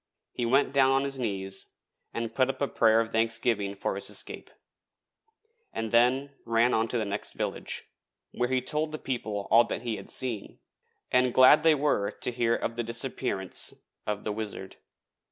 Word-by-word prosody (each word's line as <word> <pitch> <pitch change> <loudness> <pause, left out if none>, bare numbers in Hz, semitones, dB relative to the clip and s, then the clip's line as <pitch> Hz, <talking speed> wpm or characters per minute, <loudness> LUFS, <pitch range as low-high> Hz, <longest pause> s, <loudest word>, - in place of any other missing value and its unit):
He 120 - -2
went 135 +2 +3
down 135 -1 +5
on 135 0 +3
his 135 -1 -3
knees 95 -5 -3 0.4
and 115 -1 -4
put 130 +1 +2
up 135 -1 -3
a 140 - +1
prayer 115 -2 +4
of 115 0 -4
thanksgiving 110 -3 0
for 100 - -2
his 100 - -5
escape, - - -3 1.2
and 115 -1 -4
then 125 +4 +3
ran 115 +1 +2
on 110 +1 +2
to 120 - -2
the 110 - -1
next 100 +1 -2
village, - - -3 0.5
where 125 0 -1
he 130 -1 0
told 150 +3 -1
the 155 - -4
people 110 -8 -4
all 115 +2 +7
that - - -4
he 115 -3 -2
had - - -11
seen, 120 -6 -2 0.5
and 125 -1 +3
glad 130 +4 +8
they 160 -1 +5
were 140 -8 +1
to - - -3
hear 115 -1 +1
of 115 - -3
the 120 - 0
disappearance 115 -4 -1 0.3
of 105 -1 -2
the 105 - -2
Wizard. 105 -3 -6
115 Hz, 180 wpm, -28 LUFS, 110-130 Hz, 1.2 s, glad